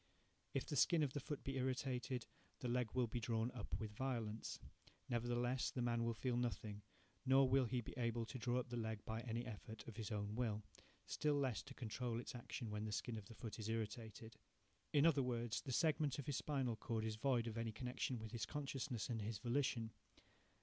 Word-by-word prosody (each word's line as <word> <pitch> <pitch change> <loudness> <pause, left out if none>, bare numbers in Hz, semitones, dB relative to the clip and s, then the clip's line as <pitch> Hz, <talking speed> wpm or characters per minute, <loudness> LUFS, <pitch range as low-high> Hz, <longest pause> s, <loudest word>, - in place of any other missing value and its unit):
If 135 - +1
the 150 - -2
skin 155 +4 +6
of 135 -3 +1
the 145 - 0
foot 145 +1 -4
be 135 0 -1
irritated, 125 -1 0 0.3
the 125 - -2
leg 120 -1 +2
will 125 -1 +4
be 120 +1 -2
drawn 115 +1 +1
up 115 -5 -3
with 110 -1 -3
violence. 115 -2 -1 0.5
Nevertheless, 120 0 +1
the 125 - -1
man 120 -1 +2
will 115 0 +1
feel 125 +2 +1
nothing, 105 -3 -1 0.4
nor 135 0 +7
will 130 0 +5
he 120 +1 +1
be - - -7
able 115 -1 +1
to 130 +3 -5
draw 120 +2 +2
up 125 - -1
the 120 - -2
leg 110 -2 -2
by 110 0 -1
any 115 0 -2
effort 110 -1 -7
of 115 -1 -7
his 110 -1 -3
own 105 -1 -1
will, 110 -3 0 0.4
still 150 -1 +2
less 135 -5 +2
to 135 - -10
control 120 0 -1
its 120 - -5
action 120 -1 -4
when 105 0 -1
the 110 - -2
skin 110 +3 -1
of 105 -2 -5
the 115 - -10
foot 115 -1 -5
is 110 0 -2
irritated. 110 0 -3 0.5
In 145 +1 +6
other 155 -4 +6
words, 120 -3 0
the 135 - -4
segment 150 -1 +3
of 140 - -3
his 145 - 0
spinal 130 -6 +1
cord 110 0 -1
is 110 -1 0
void 125 -1 +3
of 115 -2 -3
any 115 -1 0
connection 125 +2 -1
with 110 -1 -6
his 115 -2 -2
consciousness 135 -5 -2
and 115 -3 -1
his 105 +1 -1
volition. 120 0 +1
120 Hz, 210 wpm, -43 LUFS, 110-130 Hz, 0.5 s, nor